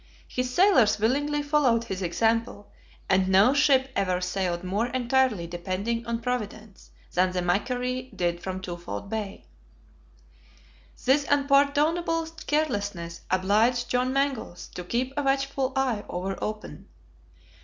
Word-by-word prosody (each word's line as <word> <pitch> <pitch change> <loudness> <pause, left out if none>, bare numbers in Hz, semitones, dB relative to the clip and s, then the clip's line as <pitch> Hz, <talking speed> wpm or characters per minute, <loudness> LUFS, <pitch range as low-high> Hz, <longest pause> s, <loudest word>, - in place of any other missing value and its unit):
His 250 0 -2
sailors 260 - +4
willingly 290 +7 0
followed 285 -6 +2
his 190 -4 -5
example, 225 +3 0 0.4
and 190 -1 +3
no 195 +7 +5
ship 275 -2 +3
ever 185 -2 +1
sailed 180 -1 -2
more 200 +6 -1
entirely 250 -5 +1
depending 190 +7 -3
on 230 0 -2
Providence 220 -4 -5 0.2
than 185 +1 +2
the 180 - 0
MACQUARIE 250 +7 -1
did 175 -1 -1
from 190 0 -4
Twofold 175 - -6
Bay. 210 - -4 1.6
This 275 +3 +3
unpardonable 290 +4 +2 0.2
carelessness 205 - -1
obliged 215 +7 +2
John 250 +1 +1
Mangles 270 -9 -2
to 180 - -6
keep 250 +8 -2
a 290 - 0
watchful 275 -1 0
eye 255 -6 0
ever 190 +2 -3
open. 215 0 -6
230 Hz, 120 wpm, -26 LUFS, 190-270 Hz, 1.6 s, no